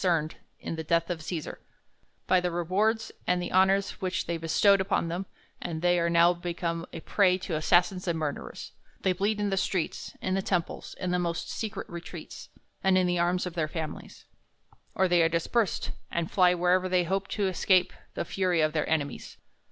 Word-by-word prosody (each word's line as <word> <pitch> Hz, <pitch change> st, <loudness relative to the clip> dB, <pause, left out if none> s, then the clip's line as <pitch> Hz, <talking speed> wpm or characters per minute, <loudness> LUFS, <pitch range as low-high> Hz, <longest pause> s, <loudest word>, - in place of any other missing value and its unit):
cerned 165 Hz, -4 st, +1 dB, 0.3 s
in 165 Hz, -, -5 dB
the 160 Hz, -, -3 dB
death 170 Hz, +2 st, +1 dB
of 165 Hz, -2 st, -4 dB
Cesar, 160 Hz, -1 st, -5 dB, 0.7 s
t)y 185 Hz, -, +5 dB
the 180 Hz, 0 st, -1 dB
rewards 200 Hz, +6 st, 0 dB, 0.2 s
and 180 Hz, 0 st, +2 dB
the 175 Hz, -, -4 dB
honors 190 Hz, +1 st, +2 dB
which 185 Hz, -1 st, -1 dB
they 170 Hz, -, -2 dB
bestowed 190 Hz, +5 st, +3 dB
upon 190 Hz, -3 st, 0 dB
them; 180 Hz, +3 st, -3 dB, 0.3 s
and 160 Hz, -1 st, -4 dB
they 175 Hz, 0 st, +4 dB
are 170 Hz, 0 st, +1 dB
now 170 Hz, +1 st, +5 dB
become 170 Hz, -1 st, -3 dB
a -, -, -7 dB
prey 185 Hz, -1 st, +3 dB
to 185 Hz, -1 st, -6 dB
assassins 180 Hz, +4 st, +2 dB
and 170 Hz, -1 st, 0 dB
murderers; 150 Hz, -3 st, -5 dB, 0.3 s
they 190 Hz, -, +2 dB
bleed 205 Hz, +4 st, 0 dB
in 205 Hz, -1 st, 0 dB
the 195 Hz, -, 0 dB
streets, 185 Hz, -3 st, -2 dB
in 185 Hz, -, -2 dB
the 195 Hz, -, +1 dB
temples, 180 Hz, -3 st, -2 dB
in 180 Hz, -, -2 dB
the 180 Hz, -, +1 dB
most 170 Hz, -1 st, -2 dB
secret 215 Hz, -2 st, -4 dB
retreats, 170 Hz, -1 st, -9 dB, 0.3 s
and 190 Hz, -1 st, +4 dB
in 185 Hz, -, +3 dB
the 175 Hz, -1 st, +1 dB
arms 175 Hz, +1 st, +1 dB
of 180 Hz, -, -5 dB
their 165 Hz, -3 st, -1 dB
families; 155 Hz, -1 st, -7 dB, 0.7 s
or 190 Hz, -, +3 dB
they 175 Hz, -1 st, +4 dB
are 165 Hz, -, +4 dB
dispersed, 175 Hz, +6 st, 0 dB, 0.2 s
and 170 Hz, -1 st, -2 dB
fly 180 Hz, -2 st, +4 dB
wherever 180 Hz, +1 st, +2 dB
they 180 Hz, -1 st, +3 dB
hope 195 Hz, +3 st, -1 dB
to 200 Hz, -2 st, -1 dB
escape 185 Hz, 0 st, +2 dB, 0.2 s
the -, -, -2 dB
fury 185 Hz, -3 st, 0 dB
of 155 Hz, -1 st, +2 dB
their 155 Hz, -2 st, -1 dB
enemies. 145 Hz, -3 st, -2 dB
180 Hz, 195 wpm, -28 LUFS, 170-190 Hz, 0.7 s, t)y